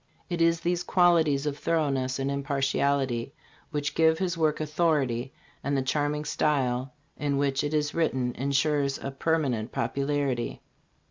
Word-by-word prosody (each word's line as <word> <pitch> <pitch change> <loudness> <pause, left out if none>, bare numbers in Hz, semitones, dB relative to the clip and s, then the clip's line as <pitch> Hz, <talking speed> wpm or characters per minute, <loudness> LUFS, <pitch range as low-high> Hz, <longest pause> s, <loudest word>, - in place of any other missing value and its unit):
It 170 -1 -1
is 165 0 +3
these 175 +1 0
qualities 165 -7 +3
of 145 -1 -2
thoroughness 140 -6 0
and 135 0 -1
impartiality 140 -2 0 0.3
which 145 -2 -2
give 160 0 +4
his 185 0 -1
work 155 -2 +1
authority, 150 -6 0 0.3
and 140 0 0
the 135 - 0
charming 150 +2 -1
style 130 -4 0 0.2
in 145 -1 0
which 140 0 +1
it 145 - -1
is 150 -1 0
written 130 -7 0
insures 140 +1 +1
a 135 - -5
permanent 135 -6 0
popularity." 140 -3 -1
145 Hz, 140 wpm, -27 LUFS, 135-155 Hz, 0.3 s, give